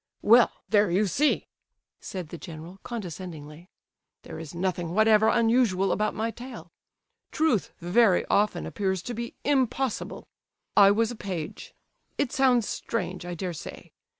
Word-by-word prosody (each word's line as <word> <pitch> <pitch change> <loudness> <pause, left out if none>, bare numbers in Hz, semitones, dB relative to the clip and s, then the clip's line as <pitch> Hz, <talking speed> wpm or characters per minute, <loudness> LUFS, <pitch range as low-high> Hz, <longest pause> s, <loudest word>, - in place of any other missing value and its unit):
"Well, 235 +3 +6 0.2
there 205 -2 +3
you 190 +5 +2
see!" 280 - +1 0.5
said 180 -5 -6
the 170 - -7
general, 165 +3 -10
condescendingly. 175 -6 -8 0.5
"There - - -8
is 165 0 -9
nothing 175 -1 -2
whatever 215 0 +5
unusual 225 -6 +3
about 215 0 0
my 225 +1 -1
tale. 245 +3 -10 0.6
Truth 305 - +1
very 185 +2 +3
often 210 +1 +1
appears 190 -3 -2
to 245 - -5
be 235 +1 -5
impossible. 265 -3 -1 0.5
I 200 -1 +8
was 225 +3 +2
a - - -6
page—it 195 - -6
sounds 255 -5 +3
strange, 185 -5 -4
I 175 - -4
dare 180 +1 -4
say. 155 - -9
205 Hz, 135 wpm, -27 LUFS, 180-235 Hz, 0.6 s, I